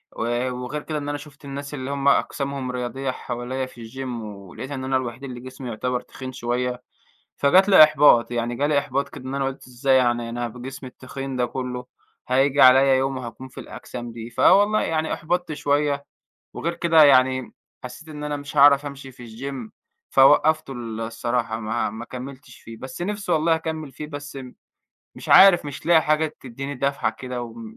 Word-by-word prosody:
و 120 +2 -1
وغير 125 +4 -5
كده 155 - -4
إن 145 0 -4
أنا 145 - -2
شُفت 145 -1 -14
الناس 140 +1 -7
اللي 130 -1 -5
هُم 140 0 -1
أجسامهم 140 -2 0
رياضية 125 +2 -3
حواليّا 125 +2 -4
في 120 -3 -11
الgym 130 +1 -6 0.2
ولقيت 105 +6 -9
إن 130 -2 -4
أنا 130 0 +1
الوحيد 125 0 -5
اللي 125 -3 -7
جسمي 130 0 -8
يُعتبَر 125 +2 -2
تخين 130 -1 -9
شويّة، 125 0 -3 0.5
فجات 185 +8 +4
لي 190 -6 +10
إحباط، 145 -6 +5
يعني 120 0 -2
جالي 145 +1 +2
إحباط 140 0 -2
كده 130 - -11
إن 130 +1 -5
أنا 135 -1 0
قُلت 135 -1 -6
إزاي 130 +2 +1
يعني 120 -2 +1
أنا 120 0 -3
بجسمي 130 +3 -8
التخين 135 +1 -7
ده 125 -1 +1
كلّه 125 0 -5 0.4
هييجي 135 +2 +3
على 130 +1 +7
يوم 135 0 -1
وهاكون 125 +1 -8
في 130 - -12
الأجسام 120 -1 -8
دي، 115 0 -8
فوالله 205 - +4
يعني 160 -1 -1
أُحبطت 175 0 -2
شويّة 145 -1 0 0.5
وغير 170 +1 -2
كده 165 -2 +4
يعني 130 -2 +4 0.3
حسّيت 160 +5 -9
إن 150 -1 -7
أنا 145 0 -2
مش 145 +1 -9
هاعرف 140 0 +6
أمشي 135 -1 -8
في 120 -1 -12
الgym 125 0 -7 0.4
فوقفته 150 +2 +4
ال 115 -3 -6
الصراحة 115 0 -2
ما 110 0 -1
ما 110 +2 -7
كملتش 130 +3 -10
فيه، 115 0 -11
بس 130 +8 -8
نفْسي 200 -2 -2
والله 160 +1 +3
أكمل 160 -3 -4
فيه 150 - -7
بس 145 -1 -8 0.8
مش - - -10
عارف 190 -4 +8
مش 145 +2 -8
لاقي 165 -2 +5
حاجة 155 0 0
تدّيني 135 +3 -6
دفعة 140 +2 0
كده 125 -1 -5
و 115 -1 -8
م 115 -1 -10
135 Hz, 185 wpm, -23 LUFS, 125-145 Hz, 0.8 s, لي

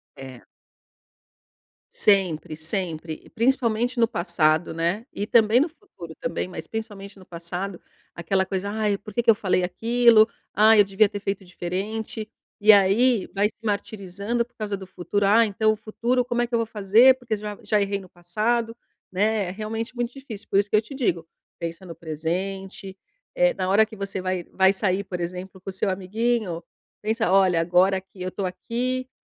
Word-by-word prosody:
É. 130 -3 -10 1.5
Sempre, 180 -6 +3
sempre 160 -1 +1
e - - -19
principalmente 240 0 0
no 230 - +4
passado, 160 -4 +1
né, 170 +7 -1
e 205 - -4
também 225 +1 +4
no 300 - +2
futuro, 200 - -13
também, 165 +2 -3
mas 185 - -8
principalmente 205 -3 -7
no 185 - -15
passado, 175 +2 -6 0.3
aquela 190 +3 0
coisa: 195 +1 -3
"Ai, 210 -1 0
por 210 0 -12
que 240 - +1
que 235 - 0
eu 225 - +7
falei 185 -3 0
aquilo? 225 +4 +4 0.3
Ai, 215 +1 +6
eu 205 - +7
devia 195 +1 +3
ter 205 - -5
feito 195 -1 -3
diferente". 205 +5 -5 0.3
E 215 +1 +8
aí, 205 +3 +4
vai 205 +1 +3
se 225 - -19
martirizando 205 +2 -2
por 245 - -36
causa 210 -3 -4
do 190 -1 -10
futuro. 195 +2 -2
"Ai, 225 +2 +5
então, 215 +2 +1
o - - -5
futuro 235 +4 -1
como 240 -1 -1
é 240 - 0
que 240 - -2
eu 230 - +2
vou 230 - 0
fazer? 220 +4 +5
Porque 230 -3 -3
já 210 0 -7
já 210 -2 +1
errei 200 0 -1
no 185 - -13
passado". 220 +7 -1 0.4
Né? 205 +1 +1
É - - -4
realmente 220 +4 -5
muito 240 0 -3
difícil, 245 -7 -9
por 195 - +2
isso 205 0 -1
que - - +1
eu - - +3
te 270 +5 -10
digo: 175 -11 -1 0.3
"Pensa 170 +2 -6
no 170 - -8
presente". 185 +4 -5 0.4
Eh, - - +3
na - - -2
hora 205 +3 +4
que 215 -1 -13
você 195 -1 -4
vai 185 -2 -2
vai 190 0 +5
sair, 195 0 -1
por 180 -2 -6
exemplo, 180 +2 -6
com 190 - -8
o - - -6
seu 190 +2 -1
amiguinho, 195 -1 -1 0.4
pensa: 220 -1 0
"Olha, 185 -3 +4
agora 180 +3 +3
que 190 0 -17
eu 185 - -3
tô 195 - -4
aqui, 255 +7 -3
200 Hz, 190 wpm, -24 LUFS, 185-225 Hz, 1.5 s, E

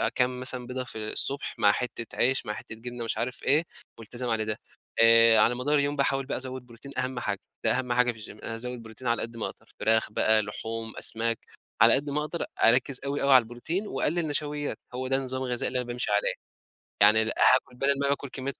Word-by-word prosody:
كام 125 0 0
مثلًا 125 -1 -1
بيضه 130 +1 -4
في 125 - -8
الصبح، 140 +1 +1
مع 100 - +5
حِتّة 115 +1 -4
عيش، 130 +2 +2
مع 105 - -3
حِتّة 110 - -8
جبنة 120 +1 -7
مش 115 - -3
عارف 125 +1 -4
إيه، 145 +4 +3 0.4
مُلتزم 120 +2 -5
علي 110 -1 0
ده، 110 0 -2 0.4
آآ 115 -1 +8
على 120 +3 +4
مدار 135 +5 0
اليوم 145 0 +1
باحاول 135 -1 0
بقى - - -3
أزوّد 130 0 -5
بروتين 120 +3 -12
أهم 130 -1 -2
حاجة، 100 -4 -3 0.2
ده 115 +3 +2
أهم 125 -2 -2
حاجة 125 0 +3
في 110 - -14
الGym 105 0 -11
أنا 115 - -4
أزود 125 +1 -5
بروتين 110 +3 -9
على 115 0 +1
قد 115 0 -6
ما 115 - -2
أقدر، - - -8
فراخ 110 0 +2
بقى 110 0 +4
لحوم، 110 +2 -6
أسماك، 115 0 +1 0.4
على - - +8
قد 145 +1 -1
ما 150 +2 -1
أقدر 165 +3 -4 0.2
أركز 125 +3 +4
أوي 140 +1 -2
أوي 140 0 +4
على 130 - +8
البروتين، 120 - -4
وأقلِّل 170 -2 -1
نشويّات، 145 0 -3
هو 130 +1 -4
ده 135 - +2
النظام 130 -1 -2
الغذائي 125 -2 -1
اللي 125 0 -1
أنا 125 - -4
بامشي 120 -3 -2
عليه، 105 0 +3 0.7
يعني 105 +2 +6
هاكل 125 +3 +2
بدل 140 +2 +2
ما 140 - +1
باكل 140 0 -1
كمية 135 +1 -4
125 Hz, 220 wpm, -27 LUFS, 115-135 Hz, 0.7 s, آآ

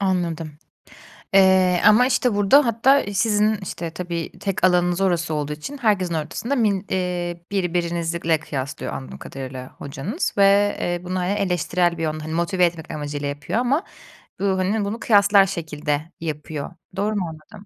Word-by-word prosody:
Anladım, 170 -5 -2 0.8
eee, 190 -2 +5
ama, 245 +4 +7
işte, 250 -3 +1
burada 205 +8 +5
hatta 250 +5 +3
sizin, 210 +1 +2
işte, 170 -2 -5
tabii 170 -1 -5
tek 195 -3 -2
alanınız 180 0 +3
orası 170 -4 +1
olduğu 150 0 -2
için 215 - -7
herkesin 200 -7 +1
ortasında 195 - -2
min 205 -4 +1
eee, 175 -2 -2
birbirinizle 170 -3 0
kıyaslıyor 140 -2 -5
anladığım 65 0 -7
kadarıyla 130 - -7
hocanız 145 - -4
ve, 200 +1 +4
eee, 175 0 -2
bunu, 185 +1 -2
hani, 180 +2 0
eleştirel 180 -3 0
bir - - -3
yön, 155 -1 -1
hani, 155 +1 -6
motive 180 +2 +1
etmek 165 -2 -2
amacıyla 145 -1 -4
yapıyor 145 +9 -3
ama 260 +7 +1 0.6
bu, 200 - -1
hani, 200 +3 0
bunu 210 +3 -4
kıyaslar 200 -3 +5
şekilde 155 -3 -3
yapıyor. 150 -2 -5 0.2
Doğru 210 +2 -1
mu 195 -3 -1
anladım? 175 +7 -13
180 Hz, 155 wpm, -22 LUFS, 160-200 Hz, 0.8 s, ama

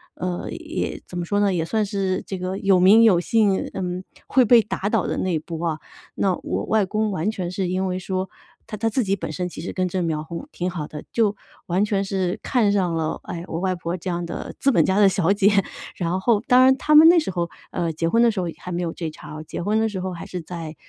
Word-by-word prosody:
呃， 180 -1 -4
也 - - -4
怎 180 - -7
么 175 - -1
说 205 +4 0
呢？ 200 -2 +2
也 165 - 0
算 215 +5 0
是 195 -2 -1
这 190 - -4
个 185 +1 -3
有 195 -2 +3
名 215 +5 +7
有 185 -6 +5
姓， 205 -2 +2 0.2
嗯， 180 -1 -3 0.2
会 260 - +4
被 235 0 +6
打 205 -1 -3
倒 220 -5 +1
的 - - -1
那 175 -4 0
波 165 +1 -5
啊。 160 -1 -1 0.4
那 190 -2 +1
我 - - -2
外 215 -2 +2
公 215 +2 -1
完 190 +4 -1
全 180 -5 -4
是 185 0 -2
因 185 +1 -1
为 180 - -2
说， 185 0 -3 0.4
他 - - -5
他 225 +2 0
自 255 - 0
己 195 +1 +1
本 165 -4 -5
身 180 +3 -3
其 170 - -8
实 175 - -5
根 185 -1 -1
正 180 0 -2
苗 155 -2 -1
红 170 - -7
挺 180 +1 -3
好 160 -4 -5
的， 150 - -8
就 215 -3 +2 0.3
完 185 +4 +2
全 200 -2 0
是 190 -2 -1
看 235 -5 +2
上 185 -4 +1
了 160 -1 -1
哎， 170 0 -6
我 165 - -4
外 190 -1 +1
婆 170 0 -4
这 185 +1 -5
样 175 0 -2
的 170 - -6
资 275 0 +3
本 - - +5
家 190 +2 +1
的 205 - +7
小 190 -1 +2
姐。 200 0 +4 0.5
然 175 +1 -1
后 210 +1 +2
当 250 +1 +7
然 265 +1 +6
他 305 +4 +1
们 310 +2 +9
那 345 +1 +7
时 310 - +1
候， 170 -1 -2 0.2
呃， 170 -2 -2
结 165 +2 -1
婚 230 +4 +3
的 235 - +5
时 210 -4 -1
候 175 - -2
也 - - -8
还 180 - -7
没 175 - -2
有 165 - -2
这 165 -1 -5
茬 155 - -12
儿 155 - -7
啊， - - -7
结 165 - -6
婚 210 +3 +1
的 225 - +2
时 195 -4 -4
候 185 0 -3
还 170 - -7
是 180 - -6
在， 165 -1 -7
185 Hz, 285 characters per minute, -23 LUFS, 175-205 Hz, 0.5 s, 们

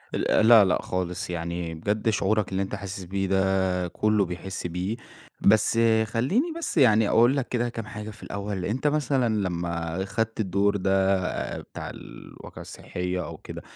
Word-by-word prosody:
ال 110 - +2
لأ، 115 -3 +9
لأ 90 - +1
خالص 90 -1 -3
يعني، 85 -1 -4
بجد 105 +7 -1
شعورك 105 -1 +1
اللي 95 +1 0
أنت 95 - -5
حاسس 100 -1 -6
بيه 95 +2 -2
ده 95 -1 +1
كله 105 +2 +1
بيحس 90 +1 -5
بيه، 90 +7 -3 0.4
بس 110 +2 +4 0.3
خلّيني 150 - 0
بس 335 - -3
يعني 110 -6 +5
أقول 120 +5 +4
لك 130 - -1
كده 120 -1 0
كام 115 -2 -6
حاجة 105 0 -7
في 110 - -12
الأول، 100 -2 -4
أنت 130 +9 -1
مثلًا 135 -6 +1
لما 85 -2 -2
خدت 110 +3 -2
الدور 100 0 +1
ده 95 0 +2 0.4
بتاع - - -8
الواقعة - - -11
الصحية 90 0 -4
أو - - -8
كده، - - -9
100 Hz, 160 wpm, -26 LUFS, 90-110 Hz, 0.4 s, لأ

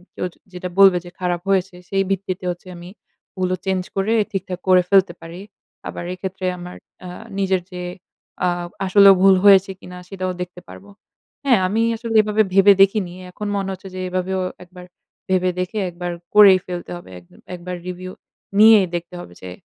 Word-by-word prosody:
কেউ - - -3 0.3
যেটা 180 0 -6
বলবে 195 -2 +7
যে 175 - -9
খারাপ 175 -1 -2
হয়েছে 190 -1 0
সেই 195 0 +1
ভিত্তিতে 190 -1 -3
হচ্ছে 175 +1 -11
আমি 175 +1 -11 0.5
ওগুলো 185 0 -1
চেঞ্জ 190 -1 0
করে 195 +3 0 0.2
ঠিকঠাক 185 -2 -4
করে 185 -1 +6
ফেলতে 195 -3 +4
পারি। 170 +3 -10 0.5
আবার - - -6
এক্ষেত্রে 185 0 -6
আমার 180 0 -9 0.3
আ - - -7 0.3
নিজের 190 -2 +1
যে 180 - -7 0.6
আ - - +3 0.4
আসলেও 195 +1 +7
ভুল 195 -1 +6
হয়েছে 195 -1 +6
কিনা 180 -1 -11
সেটাও 185 -2 -3
দেখতে 180 0 -7
পারব। 195 - -13 0.6
হ্যাঁ 245 -7 +4
আমি 215 +4 0 0.2
আসলে 230 0 -5
এভাবে 215 +1 +1
ভেবে 195 +1 +7
দেখিনি। 195 -2 +2 0.2
এখন 210 +3 -6
মনে 195 -1 -2
হচ্ছে 190 +1 -11
যে - - -5
এভাবেও 185 +1 -2 0.2
১ 180 - -20
বার 180 0 -10 0.4
ভেবে 185 -1 +2
দেখে 180 +4 -3
১ 175 - -15
বার 175 0 -2 0.2
করেই 195 -3 +8
ফেলতে 175 -1 -6
হবে। 175 - -14 0.4
১ 180 - -7
বার 180 0 -4
রিভিউ 185 0 -6 0.5
নিয়েই 215 -3 +7
দেখতে 170 +1 -6
হবে 90 - -11
যে 90 - -8
185 Hz, 175 wpm, -20 LUFS, 180-195 Hz, 0.6 s, করেই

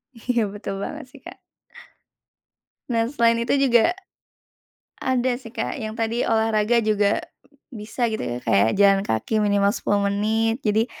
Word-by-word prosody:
Iya, 230 -2 -1
betul 200 -2 -6
banget 200 - -6
sih, - - -15
Kak. - - -12 1.5
Nah, 230 -1 +2
selain 230 -4 +2
itu 235 - 0
juga 270 +5 +3 1.1
ada 255 0 +1
sih, 245 -3 -11
Kak, 250 - -3
yang 215 0 -5
tadi 230 +2 -1
olahraga 220 0 +2
juga 210 -1 +2 0.5
bisa 220 +2 -4
gitu 220 - -3
ya, 120 - -3
kayak 100 +3 +3
jalan 200 -1 +5
kaki 205 - -1
minimal 200 -1 +2
10 200 -2 0
menit. 225 +3 0
Jadi 220 +2 +1
220 Hz, 140 wpm, -23 LUFS, 205-235 Hz, 1.5 s, jalan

